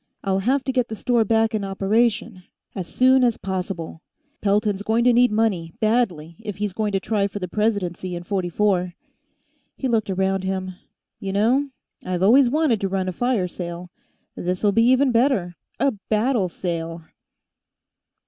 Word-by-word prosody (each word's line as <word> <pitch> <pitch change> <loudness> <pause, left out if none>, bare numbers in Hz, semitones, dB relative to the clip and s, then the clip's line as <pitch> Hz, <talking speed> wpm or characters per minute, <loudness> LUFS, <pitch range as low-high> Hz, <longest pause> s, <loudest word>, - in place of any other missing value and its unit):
I'll 195 -1 +1
have 260 +7 +1
to 265 - -1
get 250 -2 0
the 220 - -5
store 235 +1 +2
back 225 +1 +2
in 215 -2 -1
operation, 195 0 0 0.3
as 185 -3 -5
soon 260 0 +4
as 240 -2 +2
possible. 185 -4 -5 0.4
Pelton's 205 0 +1
going 220 +3 +1
to 245 0 +5
need 245 0 +4
money, 200 -7 0
badly, 190 -8 0
if 210 -4 -6
he's 205 -2 -2
going 210 +1 -1
to 195 - +2
try 205 0 0
for 200 - -7
the 185 -2 -4
presidency 185 -3 -1
in 175 - -6
'44." 180 -1 0 0.8
He 265 - -2
looked 220 -4 0
around 190 0 0
him. 190 0 -3 0.5
"You 195 -1 -4
know, 250 +8 +2 0.3
I've 180 0 -2
always 245 +5 +6
wanted 285 -6 +1
to 195 - -1
run 190 -1 -1
a - - -4
fire 245 -4 0
sale; 175 0 -7 0.4
this'll 180 +4 0
be 230 +3 +3
even 260 +1 +4
better 230 -8 +1 0.2
a 275 - +3
battle 215 0 0
sale!" 165 -1 -4
205 Hz, 165 wpm, -22 LUFS, 185-230 Hz, 0.8 s, always